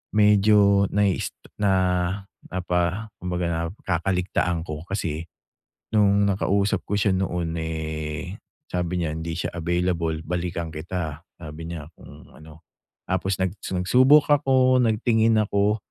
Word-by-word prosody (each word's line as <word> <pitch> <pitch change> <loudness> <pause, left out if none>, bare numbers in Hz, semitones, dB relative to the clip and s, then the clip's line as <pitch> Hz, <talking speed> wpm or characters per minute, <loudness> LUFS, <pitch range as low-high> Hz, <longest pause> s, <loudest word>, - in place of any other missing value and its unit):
medyo 105 -1 +5
na-is 100 -2 0 0.2
na 100 -1 +2 0.8
napa 90 +4 -1
kumbaga, 85 -2 -2
nakakaligtaan 90 -2 -1
ko. 75 +1 -7
Kasi 85 -4 -3 0.7
nung 100 -1 +4
nakausap 100 +1 +1
ko 105 - -1
siya 100 -1 +2
noon, 90 -3 -1
eh, 80 +3 -5 0.2
sabi 90 - -2
niya 85 -3 -1
hindi 80 +1 -4
siya - - -3
available, 85 -2 -1
balikan 85 -1 -3
kita, 80 -1 -4 0.2
sabi 80 0 -8
niya 80 -3 -6
kung - - -15
ano. 80 +1 -15 0.4
Tapos 95 +1 -1
nag 95 -1 0
nagsubok 130 +12 +4
ako, 130 -2 +4
nagtingin 110 0 +2
ako 105 0 +2
90 Hz, 115 wpm, -24 LUFS, 85-100 Hz, 0.8 s, medyo